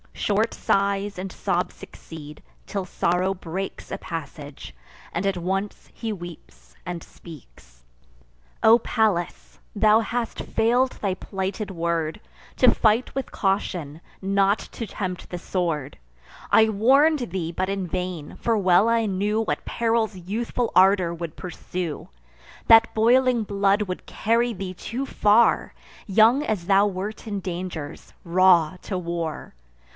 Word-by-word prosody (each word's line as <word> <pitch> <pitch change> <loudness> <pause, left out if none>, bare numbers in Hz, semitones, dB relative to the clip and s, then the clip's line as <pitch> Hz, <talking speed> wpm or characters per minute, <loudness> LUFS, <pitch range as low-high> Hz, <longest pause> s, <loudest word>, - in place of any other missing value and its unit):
Short 215 +2 0
sighs 200 0 0
and 185 +1 -5
sobs - - -2
succeed; 150 -2 -11 0.2
till 195 -2 -3
sorrow 180 +1 0
breaks 190 +1 -6
A - - -2
passage, 145 - -8 0.4
and 175 +3 -2
at 195 -2 0
once 195 +3 -3
he 225 -2 -4
weeps 175 -4 -11
and 175 -1 -5
speaks: 60 - -15 0.8
"O 230 +2 +7
Pallas! 170 - -1 0.2
thou 215 +1 +5
hast 235 +1 -3
fail'd 245 +3 +1
thy 195 -3 -2
plighted 195 +3 -4
word, 170 0 -2 0.4
To 250 -2 +6
fight 225 +3 +2
with 270 - -4
caution, 180 -6 -1 0.2
not 195 +1 +2
to 230 - -5
tempt 185 -3 -5
the 180 - -5
sword! 165 - -2 0.5
I 220 0 +6
warn'd 265 - +3
thee, 170 -3 -3
but 185 +2 -2
in 195 -2 -2
vain; 180 -3 -4
for 230 -1 +1
well 190 +1 +4
I 230 -1 +2
knew 205 +2 0
What 225 - -3
perils 225 -2 0
youthful 225 +6 -3
ardour 185 -2 +5
would 170 -1 -6
pursue, 180 -2 -5 0.6
That 225 0 +7
boiling 240 +1 +3
blood 200 0 +1
would 185 -2 -6
carry 235 +2 0
thee 190 -2 -5
too 240 +8 -5
far, 220 -2 +3 0.3
Young 225 +8 +5
as 205 - -2
thou 200 +1 +5
wert 205 +4 -5
in 205 -2 -3
dangers, 175 -5 -6
raw 175 -1 +4
to 190 - -3
war! 170 - -4
195 Hz, 135 wpm, -24 LUFS, 175-220 Hz, 0.8 s, O